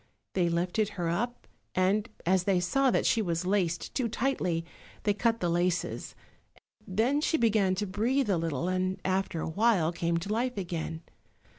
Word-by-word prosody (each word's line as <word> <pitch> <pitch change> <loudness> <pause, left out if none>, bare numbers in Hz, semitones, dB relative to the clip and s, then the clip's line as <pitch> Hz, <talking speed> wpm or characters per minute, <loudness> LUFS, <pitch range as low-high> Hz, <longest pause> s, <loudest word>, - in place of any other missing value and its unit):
They 175 -2 +2
lifted 180 +5 0
her 170 -2 0
up, 235 +8 -2 0.3
and, 200 +5 +2 0.2
as 185 +1 +3
they 195 -3 +3
saw 265 +10 +2
that - - +1
she 230 - +3
was 170 -3 -1
laced 180 -3 0
too 245 -4 0
tightly, 190 -9 -1 0.4
they 205 - +3
cut 225 +2 +1
the 175 - +1
laces; 175 0 -1 0.7
then 230 +10 +1
she 320 - +2
began 215 -6 +3
to 205 +2 -1
breathe 230 +7 +1
a 185 - +2
little, 165 0 -2
and 185 0 0
after 190 -3 0
a - - -2
while 190 -2 +3
came 170 0 0
to 195 +5 -2
life 245 +1 -1
again. 170 -3 -4
185 Hz, 170 wpm, -29 LUFS, 175-220 Hz, 0.7 s, as